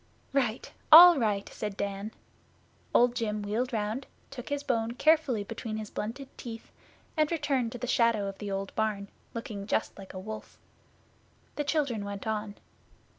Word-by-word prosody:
'Right! 250 -4 0 0.2
All 340 0 +11
right!' 205 -4 0
said 210 -2 -5
Dan. 200 +1 -3 0.8
Old 245 0 +4
Jim 215 -3 -2
wheeled 230 +6 -1
round, 220 +3 -2 0.2
took 250 -3 -8
his 285 0 -2
bone 230 -4 0
carefully 300 -6 +3
between 220 +1 -5
his 215 -1 -6
blunted 260 +6 -5
teeth, 230 -2 -8 0.4
and 310 0 +2
returned 280 -7 0
to - - -5
the 250 - -4
shadow 230 -4 +2
of 195 0 -7
the 205 - -5
old 195 0 -3
barn, 210 -2 -1 0.3
looking 210 -3 -5
just 220 - 0
like 195 -1 -10
a - - -4
wolf. 215 +3 -8 1.0
The 295 - -1
children 280 -8 0
went 200 -1 -6
on. 215 -1 -3
225 Hz, 160 wpm, -29 LUFS, 210-260 Hz, 1.0 s, All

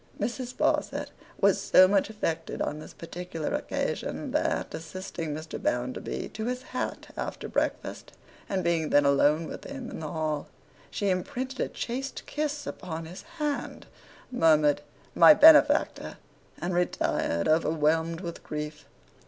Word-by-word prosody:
Mrs. 250 +1 -3
Sparsit - - 0 0.3
was - - +4
so 185 - +7
much 195 +1 +2
affected 205 -7 -3
on 150 - -2
this - - -10
particular 165 -1 -5
occasion, - - -3
that, - - 0
assisting 165 0 -6
Mr. 155 +2 -6
Bounderby 125 +1 -2
to 220 - -5
his 250 +1 -3
hat 255 - -5
after - - -4
breakfast, - - -2 0.4
and 190 -2 -1
being 165 -2 +1
then 145 0 +4
alone 145 +3 +4
with - - -7
him 270 -3 -7
in - - -6
the 155 -2 -5
hall, 155 -3 -2 0.4
she 200 - -1
imprinted 260 +7 -3
a - - +1
chaste 265 +3 -4
kiss 295 -1 -3
upon 165 -4 -6
his 175 +4 -9 0.2
hand, 295 -2 -3 0.5
murmured 155 - +4 0.3
'My 170 +5 +8
benefactor!' 310 0 +6 0.4
and 180 +1 -2
retired, 175 - 0
overwhelmed 160 +1 +2
with 170 -3 -6
grief. 150 -1 -6
170 Hz, 135 wpm, -28 LUFS, 155-235 Hz, 0.5 s, My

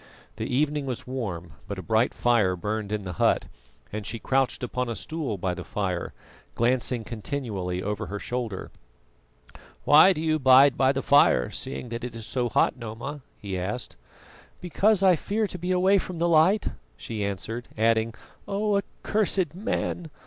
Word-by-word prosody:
The - - -3
evening 145 +2 0
was 125 -3 -4
warm, 95 - -5
but 100 - -5
a 95 - -6
bright 110 +7 +2
fire 110 -7 +2
burned 105 +3 -3
in 105 -1 -2
the 90 -2 -5
hut, - - +3 0.5
and 105 0 -3
she 115 - -4
crouched 130 +1 0
upon 125 0 -2
a 115 - -3
stool 155 -9 -4
by 90 0 -1
the - - -6
fire, 95 -4 -3 0.4
glancing 120 0 +1
continually 105 -6 -4
over 105 +1 -3
her 105 - -4
shoulder. 115 -3 -4 1.1
"Why 155 +6 +7
do 180 - -2
you 155 -1 +1
bide 135 +1 +7
by 135 0 +3
the 135 0 -2
fire, 140 - +4
seeing 130 -2 -5
that 115 +1 -5
it 125 -2 -5
is 115 -1 -6
so 125 0 -1
hot, - - +2
Noma?" 120 +5 -6 0.2
he 95 -3 -4
asked. 105 +7 -4 0.6
"Because 195 +3 +2
I 185 -2 +6
fear 210 +7 -1
to 180 -3 -6
be 180 +2 -4
away 190 +2 +4
from 180 -1 -6
the 170 +1 +1
light," 170 +6 +4 0.3
she 105 - -4
answered; 110 +5 -4
adding, 115 0 +2 0.3
"Oh, 205 +1 +1
accursed 195 -4 -1
man! 180 -3 -3
125 Hz, 170 wpm, -26 LUFS, 105-155 Hz, 1.1 s, Why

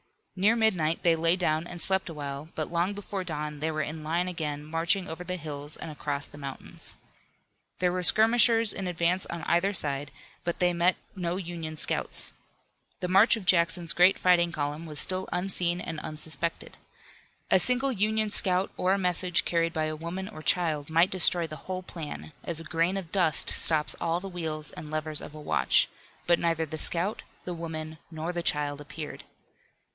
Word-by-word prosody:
Near 200 +5 +3
midnight 180 -8 +1
they 170 -1 +4
lay 165 +2 +3
down 165 -2 0
and 175 - -8
slept 190 +2 +2
a - - -6
while, 140 +1 -6
but 155 0 -3
long 175 +3 0
before 200 -1 -5
dawn 150 -3 -5
they 155 +2 -1
were 155 -1 -2
in 155 +1 -6
line 170 +4 -1
again 150 -4 -4
marching 165 +4 0
over 160 +3 -7
the 180 +1 -4
hills 150 -3 -7
and 160 - -7
across 145 -1 -4
the 145 - -12
mountains. 140 -2 -6 0.8
There 180 -1 +1
were 180 0 -2
skirmishers 225 +3 +5
in 195 - -4
advance 175 +1 0
on 170 -1 -6
either 175 +6 +1
side, 145 -4 -1 0.3
but 170 -1 -2
they 180 -1 +2
met 175 +2 +2 0.2
no 175 -2 -2
Union 165 -4 -6
scouts. - - -1 0.7
The 180 - -2
march 195 +6 +5
of 220 -4 -8
Jackson's 170 -2 +4
great 180 +3 +5
fighting 175 -2 +3
column 150 +1 -4
was 150 -1 -7
still 185 0 -1
unseen 180 -1 +1
and 160 -3 -5
unsuspected. 160 +2 -5 0.7
A 190 - +6
single 255 +6 +2
Union 215 -1 0
scout 185 -1 +5
or 185 +1 +2
a - - +1
message 180 -1 +1
carried 165 -1 0
by 155 -1 -1
a 155 0 -3
woman 170 +4 -5
or 205 -7 -10
child 155 -3 +1
might 165 +3 +3
destroy 175 -2 +5
the 155 -1 -8
whole 185 0 -4
plan, 160 -3 -8
as 170 -2 -4
a - - -5
grain 165 +4 0
of 175 -4 -7
dust 180 -6 +4
stops 155 -2 +5
all 170 0 0
the 195 - -7
wheels 160 -5 -5
and 150 - -9
levers 155 0 -1
of 150 - -10
a - - -9
watch, 150 - +2 0.4
but 175 0 +3
neither 165 -1 0
the 155 +1 -7
scout, 180 +8 +3 0.2
the 180 - -4
woman 160 -2 -6
nor 165 +1 -5
the 175 - -2
child 145 -2 -1
appeared. 150 +1 -8
170 Hz, 190 wpm, -27 LUFS, 155-185 Hz, 0.8 s, A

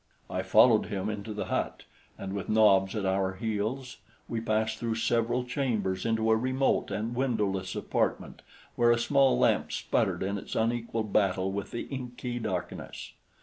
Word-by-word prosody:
I - - -1
followed 115 -4 +5
him 100 0 -2
into 105 +1 -6
the 105 - -3
hut, - - -2 0.3
and 95 0 -5
with 100 -1 -4
Nobs 100 -2 +4
at 105 -3 -2
our 95 0 +1
heels 115 +5 -3 0.3
we 115 -1 -3
passed 110 0 0
through 115 -1 -1
several 115 +2 +1
chambers 115 -8 -1
into 110 0 +2
a - - +6
remote 130 +3 +1
and 110 +3 -3
windowless 105 -7 -1
apartment - - -2 0.3
where 120 0 +4
a 120 - +5
small 135 +3 +3
lamp - - +2
sputtered - - 0
in 100 +1 -2
its - - -7
unequal 115 0 0
battle 95 -2 +1
with 100 +1 -4
the 120 - -4
inky 125 -2 -5
darkness. 95 -6 -5
110 Hz, 160 wpm, -29 LUFS, 100-120 Hz, 0.3 s, a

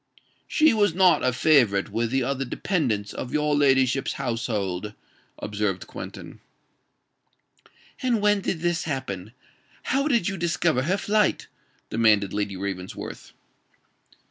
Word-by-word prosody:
"She 310 -3 +4
was 205 -6 +2
not 185 -2 +4
a 130 - +3
favorite 120 -8 +3
with 115 +2 -1
the 135 +1 +1
other 135 +1 -1
dependants 120 - -1
of 125 - -6
your 150 0 +1
ladyship's 135 -2 +2
household," 105 -6 -3 0.4
observed 105 -3 -2
Quentin. - - -9 1.6
"And 245 -3 +1
when 205 -1 +2
did 165 -3 -2
this 175 -1 0
happen? 115 - -4 0.5
how 275 +3 0
did 235 - +2
you 195 - -2
discover 170 -5 +1
her 180 +8 0
flight?" 210 +1 +1 0.5
demanded 105 -4 +3
Lady 100 -2 -2
Ravensworth. 95 -1 -6
135 Hz, 120 wpm, -25 LUFS, 105-175 Hz, 1.6 s, She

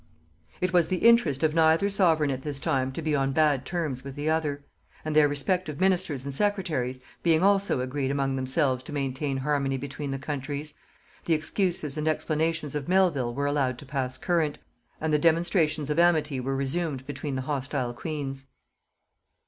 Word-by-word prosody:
It 185 0 0
was 175 -2 +4
the 185 +5 +2
interest 180 - +4
of 155 -1 +3
neither 160 +4 +4
sovereign 165 -7 +3
at 130 -1 -3
this 145 -1 -5
time 135 -5 0
to 165 - -5
be 155 -1 +1
on 135 -1 0
bad 145 -4 +2
terms 155 -8 -3
with 135 -1 -8
the 150 +2 -1
other; 150 -3 -1 0.4
and 155 -1 -2
their 150 -1 +6
respective 150 +1 -1
ministers 180 -8 +1
and 140 - -4
secretaries 155 -9 -1 0.2
being 165 0 +3
also 200 -8 +3
agreed 130 +1 -2
among 135 -1 0
themselves 130 0 +1
to - - -8
maintain 135 0 -2
harmony 135 -1 0
between 140 +2 -5
the 135 - -2
countries, 145 +1 -4 0.5
the 165 - +3
excuses 155 -2 -1
and 155 - -2
explanations 155 -1 0
of 150 -1 -3
Melvil 160 -11 +2
were 140 +1 -1
allowed 140 -3 0
to 140 - -10
pass 130 -2 -3
current, 160 -1 0 0.4
and 155 0 -1
the 150 - +4
demonstrations 160 -2 +2
of 150 - +1
amity 155 -5 +3
were 135 +2 -2
resumed 135 0 -2
between 140 0 -4
the 130 - -2
hostile 135 -3 -2
queens. 135 -1 -5
150 Hz, 175 wpm, -27 LUFS, 135-160 Hz, 0.5 s, their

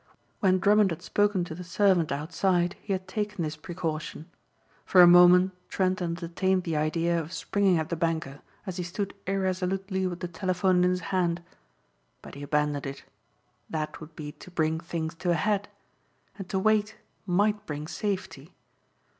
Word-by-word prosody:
When 185 -2 +3
Drummond 205 +1 +4
had 165 - -5
spoken 205 -3 +1
to 175 - -6
the 180 +3 -7
servant 180 -2 +2
outside 175 +4 0
he 205 - -6
had 185 -1 -2
taken 210 -4 -3
this 155 0 -3
precaution. 160 0 -5 0.5
For 180 -1 +7
a - - +9
moment 180 +1 +7 0.2
Trent 185 0 0
entertained 175 +2 -1
the 165 -3 -2
idea 165 +3 +1
of 160 0 -6
springing 190 +2 +1
at 160 -1 -2
the 170 - -1
banker 165 -4 -2 0.2
as 185 -3 -5
he 180 - -2
stood 195 +3 -4
irresolutely 190 0 -1
with 175 -1 -6
the 180 - -2
telephone 180 +1 +1
in 180 - +4
his 180 0 -1
hand. 175 -2 +1 0.8
But - - -11
he 140 - -9
abandoned 145 0 0
it. 135 0 -8 0.6
That 155 -1 -4
would 155 0 -11
be 150 -1 -6
to 170 - -14
bring 160 -2 0
things 165 -1 -4
to 180 - -2
a 170 - +4
head. 205 +4 0 0.7
And 195 -3 -8
to 190 - -1
wait 215 +2 +2 0.3
might 205 +3 +1
bring 150 0 -4
safety. 200 +1 -4
180 Hz, 170 wpm, -27 LUFS, 165-190 Hz, 0.8 s, a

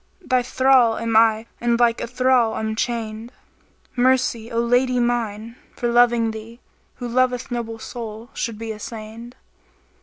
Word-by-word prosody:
* - - -40
Thy 255 -1 +4
thrall 255 -2 +3
am 230 -1 -2
I 220 0 +4
and 235 0 +1
like 235 -1 +3
a - - -3
thrall 250 -2 +2
I'm 220 0 -2
chainčd: 225 -1 -3 0.7
Mercy, 245 -2 +1
O 230 - 0
lady 245 +2 +2
mine, 230 -1 -2 0.2
for 240 - -1
loving 240 -1 +4
thee! 220 +2 -10 0.2
* - - -40
Who 245 - -6
loveth 250 +1 0
noble 230 -2 -4
soul 225 0 -8
should 230 -2 -3
be 225 +1 -6
assainčd." 220 +2 -8
235 Hz, 155 wpm, -22 LUFS, 225-245 Hz, 0.7 s, Thy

